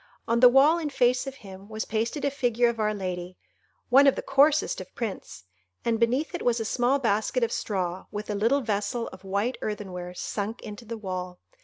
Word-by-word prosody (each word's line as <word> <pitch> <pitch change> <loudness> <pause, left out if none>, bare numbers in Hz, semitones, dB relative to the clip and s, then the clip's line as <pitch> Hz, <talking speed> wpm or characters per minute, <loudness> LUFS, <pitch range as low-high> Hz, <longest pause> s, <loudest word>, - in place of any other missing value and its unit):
On 230 +1 +2
the 250 0 +9
wall 285 +6 +5
in 310 -3 -2
face 250 -1 +2
of 270 - -5
him 195 +1 -11
was 220 0 -4
pasted 230 +7 -2
a 280 - +1
figure 245 -3 +2
of 235 -1 -4
Our 215 -1 +2
Lady—one 185 +7 -1
of 275 - +5
the - - -4
coarsest 285 -3 +3
of 185 - -12
prints—and 95 - -5
beneath 255 +9 +1
it 350 - -4
was 240 -1 +1
a 225 - -2
small 245 +4 +2
basket 230 0 0
of 230 - +1
straw, 185 -3 -3
with 210 +1 -6
a - - -1
little 230 +8 +2
vessel 230 +1 -2
of 185 0 -13
white 200 +6 -1
earthenware 180 -4 -5
sunk 210 +4 -4
into 210 +2 -8
the 230 +1 -5
wall. 185 -3 -5
225 Hz, 195 wpm, -26 LUFS, 195-250 Hz, -, the